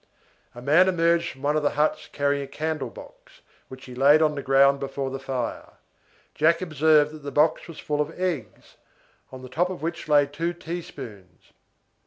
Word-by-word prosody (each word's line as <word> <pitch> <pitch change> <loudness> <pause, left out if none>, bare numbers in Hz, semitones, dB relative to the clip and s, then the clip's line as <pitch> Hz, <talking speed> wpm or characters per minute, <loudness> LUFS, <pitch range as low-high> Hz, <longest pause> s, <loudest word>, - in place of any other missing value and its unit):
A 120 - -10
man 165 +7 +5
emerged 170 -1 +2
from 135 - -12
one 145 +1 +1
of 155 - +1
the 145 - +2
huts 150 +1 0
carrying 140 0 0
a - - -8
candle 155 +2 -3
box, - - -15 0.3
which 130 0 -11
he 125 - -10
laid 140 +4 +5
on 155 -1 +2
the 145 - -4
ground 140 +1 +4
before 135 -1 -4
the 135 - -5
fire. 130 -3 -5 0.6
Jack 165 +2 +3
observed 155 -3 +3
that 155 - -10
the 140 - -6
box 150 +3 +1
was 165 -3 -10
full 150 0 -2
of 155 +4 -5
eggs, 170 - -4 0.5
on 130 -1 -10
the - - -8
top 170 +8 0
of 185 -4 -7
which 165 -1 -4
lay 145 -1 +5
two 165 +5 -3
teaspoons. 130 - -9
150 Hz, 190 wpm, -25 LUFS, 135-165 Hz, 0.6 s, man